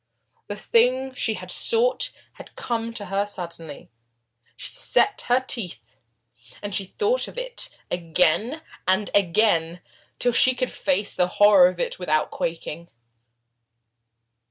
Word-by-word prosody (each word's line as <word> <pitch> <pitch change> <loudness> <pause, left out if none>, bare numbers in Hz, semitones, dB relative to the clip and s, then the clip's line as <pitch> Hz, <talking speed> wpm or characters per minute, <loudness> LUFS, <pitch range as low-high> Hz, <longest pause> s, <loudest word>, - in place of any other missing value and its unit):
The 205 - -5
thing 255 +5 +1
she 225 -3 0
had - - -7
sought 475 +2 +1 0.2
had - - -14
come 230 -1 -3
to 205 - -5
her 200 +2 -1
suddenly. 170 - -8 0.7
She - - -4
set 415 - +2
her 245 +1 +4
teeth, 170 - -3 0.6
and 205 -1 -6
thought 420 - 0
of - - -12
it - - -2 0.2
again 180 - +1 0.2
and 190 +2 +1
again, 175 -3 +2 0.4
till 245 - +1
she 255 +2 +6
could 255 0 -2
face 270 -8 0
the 180 - +1
horror 205 -3 +7
of 180 -1 -9
it - - -3
without 155 -4 0
quaking. 165 0 -5
205 Hz, 130 wpm, -23 LUFS, 175-250 Hz, 0.7 s, horror